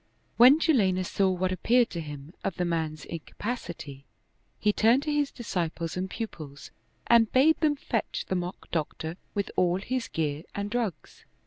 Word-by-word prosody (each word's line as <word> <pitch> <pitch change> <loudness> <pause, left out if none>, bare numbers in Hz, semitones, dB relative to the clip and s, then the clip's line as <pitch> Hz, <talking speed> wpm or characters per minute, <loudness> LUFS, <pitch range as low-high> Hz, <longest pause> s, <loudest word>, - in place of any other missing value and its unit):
When 255 +6 +8
Jalinus 190 - +2
saw 195 -1 +3
what 185 0 0
appeared 235 +6 +3
to 170 - -4
him 150 +1 -8
of 195 - -2
the 180 - -1
man's 160 -2 -2
in 165 - -5
capacity, 165 - -6 0.5
he 210 -1 +2
turned 235 +7 +4
to 300 -1 -1
his 290 -1 +1
disciples 170 -7 -3
and 185 +1 -2
pupils 155 -12 -7 0.3
and 230 -2 +5
bade 295 +5 +5
them 305 -2 +3
fetch 280 - -2
the - - -1
mock 180 0 -4
doctor, 160 +1 -3 0.2
with 200 -1 -1
all 180 0 +3
his 250 +5 -3
gear 150 -2 -2
and 200 0 -3
drugs. 230 -8 -4
185 Hz, 165 wpm, -28 LUFS, 165-240 Hz, 0.5 s, When